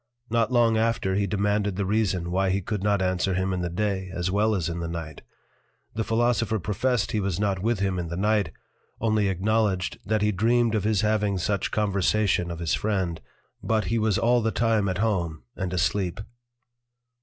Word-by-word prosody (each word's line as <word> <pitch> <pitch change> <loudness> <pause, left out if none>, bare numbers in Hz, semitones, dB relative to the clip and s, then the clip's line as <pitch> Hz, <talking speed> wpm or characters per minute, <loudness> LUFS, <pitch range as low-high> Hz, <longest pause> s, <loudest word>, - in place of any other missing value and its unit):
Not 115 +1 +2
long 115 -2 +4
after, 110 -4 +1
he 100 +1 +1
demanded 100 0 0
the 100 +1 -1
reason 95 -4 0
why 95 +1 +1
he 95 +1 +1
could 100 +1 -3
not 100 -1 +1
answer 95 0 0
him 95 +1 0
in 90 - -2
the 85 - -2
Day 95 +1 -2
as 90 0 -2
well 105 +2 +2
as 90 -4 -1
in 85 0 -3
the 85 - -3
Night; 80 -3 -6 0.7
The 110 - -1
Philosopher 115 -1 +1
professed 105 +3 0
he 110 - 0
was 95 -3 -1
not 100 -3 0
with 110 -1 0
him 95 -2 0
in 85 - -3
the 85 +1 -5
Night, 105 -3 +1 0.5
only 110 -2 +1
acknowledged 95 0 0
that 110 +1 0
he 105 - +3
dreamed 115 +3 +2
of 105 -2 0
his 105 -2 +2
having 105 -2 +1
such 100 +3 -1
conversation 100 -2 +1
of 85 - -5
his 85 -2 -1
Friend, 95 -6 -1 0.4
but 110 -1 +1
he 115 - +2
was 110 -3 +1
all 120 +1 +3
the 115 - +1
time 110 -3 +1
at 90 - -2
home, 85 - -1
and 95 -1 -3
asleep. 95 +1 0
100 Hz, 195 wpm, -25 LUFS, 95-110 Hz, 0.7 s, long